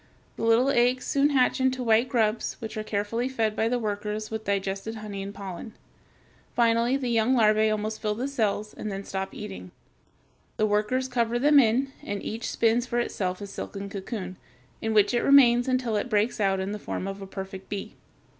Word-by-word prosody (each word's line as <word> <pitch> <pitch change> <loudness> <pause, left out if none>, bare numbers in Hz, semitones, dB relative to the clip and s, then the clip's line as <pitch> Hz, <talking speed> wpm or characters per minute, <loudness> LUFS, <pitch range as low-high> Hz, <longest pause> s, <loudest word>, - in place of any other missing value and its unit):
The - - -8
little 230 +4 +4
eggs 250 0 +2
soon 280 +1 +2
hatch 265 -2 +2
into 260 -1 +1
white 230 +2 +3
grubs 225 -2 +1
which 220 -1 -7
are 215 - -2
carefully 215 +4 -2
fed 225 -5 0
by 220 - +1
the 250 - +1
workers 210 -1 -3
with 220 0 -4
digested 200 +2 -2
honey 210 -2 -6
and 195 +1 -5
pollen. 200 +2 -8 0.8
Finally 235 +2 +3
the 255 -3 -2
young 230 +3 +3
larvæ 215 -1 +4
almost 215 +1 -2
fill 210 -1 -1
the 250 +5 -2
cells 215 -5 -1
and 215 - -5
then 195 0 -5
stop 190 0 -4
eating. 90 -1 -8 0.9
The 215 - +3
workers 215 +5 +1
cover 240 -2 0
them 290 +3 +6
in, 260 +3 +2
and 205 0 -5
each 225 +2 -4
spins 235 +2 +2
for 240 - -2
itself 185 -5 -2
a - - -4
silken 200 0 -6
cocoon, 190 -2 -6 0.4
in 220 0 -1
which 210 +2 +4
it 240 - +2
remains 245 -3 +6
until 255 -3 0
it 210 - -2
breaks 215 +1 +1
out 195 -2 +2
in 190 +1 -2
the 210 - -4
form 195 - -4
of 195 0 -6
a 195 - -7
perfect 190 0 -8
bee. 200 -1 -5
220 Hz, 195 wpm, -26 LUFS, 205-240 Hz, 0.9 s, them